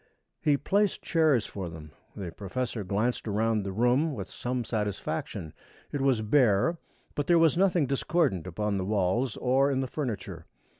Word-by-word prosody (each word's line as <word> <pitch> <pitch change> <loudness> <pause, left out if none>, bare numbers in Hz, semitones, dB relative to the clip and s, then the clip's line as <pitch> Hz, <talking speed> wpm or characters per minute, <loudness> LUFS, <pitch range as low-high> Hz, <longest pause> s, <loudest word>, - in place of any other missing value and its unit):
He 150 -6 +3
placed 200 +8 +1
chairs 155 -8 +3
for 95 -4 -5
them. 80 -2 -10 0.2
The 90 -4 -5
professor 110 +4 -4
glanced 105 +6 -1
around 110 +1 +1
the 100 -1 -4
room 125 +9 +2
with 95 -3 -6
some 125 0 -3
satisfaction. 105 -7 -3 0.4
It 145 - -2
was 130 -5 +2
bare, 125 - +3 0.3
but 145 - -2
there 175 - +5
was 165 -1 +4
nothing 180 -4 +3
discordant 135 - 0
upon 100 +3 -1
the 95 - -2
walls 105 +4 0
or 135 +2 +3
in 135 -1 0
the 130 - -2
furniture. 120 - -5
120 Hz, 160 wpm, -28 LUFS, 100-145 Hz, 0.4 s, there